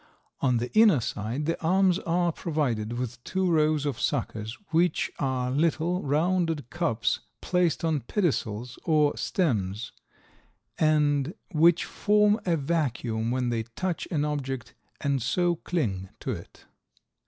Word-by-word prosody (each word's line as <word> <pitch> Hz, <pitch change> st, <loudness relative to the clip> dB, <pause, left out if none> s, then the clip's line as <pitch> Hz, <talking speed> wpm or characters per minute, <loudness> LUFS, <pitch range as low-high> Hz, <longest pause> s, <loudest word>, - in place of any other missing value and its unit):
On 125 Hz, -3 st, +2 dB
the 120 Hz, +2 st, -3 dB
inner 215 Hz, -, +6 dB
side, 115 Hz, +5 st, -3 dB
the 165 Hz, -, -1 dB
arms 185 Hz, +2 st, +3 dB
are 175 Hz, -2 st, +1 dB
provided 130 Hz, -10 st, -1 dB
with 125 Hz, 0 st, -5 dB
two 190 Hz, 0 st, -1 dB
rows 155 Hz, -2 st, +2 dB
of 135 Hz, -5 st, -2 dB
suckers, 110 Hz, +2 st, -2 dB
which 170 Hz, +2 st, +2 dB
are 130 Hz, -2 st, 0 dB
little, 165 Hz, +5 st, +1 dB
rounded 160 Hz, -1 st, 0 dB
cups 120 Hz, -10 st, 0 dB, 0.2 s
placed 180 Hz, -2 st, +1 dB
on 160 Hz, -2 st, +1 dB
pedicels 125 Hz, -, -2 dB
or 150 Hz, -3 st, +3 dB
stems 110 Hz, -, -1 dB, 0.9 s
and 150 Hz, 0 st, +2 dB, 0.2 s
which 170 Hz, +2 st, +4 dB
form 210 Hz, +1 st, +3 dB
a 170 Hz, -2 st, +3 dB
vacuum 125 Hz, -7 st, -1 dB
when 125 Hz, 0 st, 0 dB
they 115 Hz, -1 st, 0 dB
touch 160 Hz, +11 st, -4 dB
an 150 Hz, -3 st, 0 dB
object 135 Hz, -4 st, -3 dB, 0.3 s
and 140 Hz, -2 st, 0 dB
so 175 Hz, +9 st, +1 dB
cling 100 Hz, -, -2 dB
to -, -, -3 dB
it. -, -, -9 dB
150 Hz, 130 wpm, -27 LUFS, 120-170 Hz, 0.9 s, inner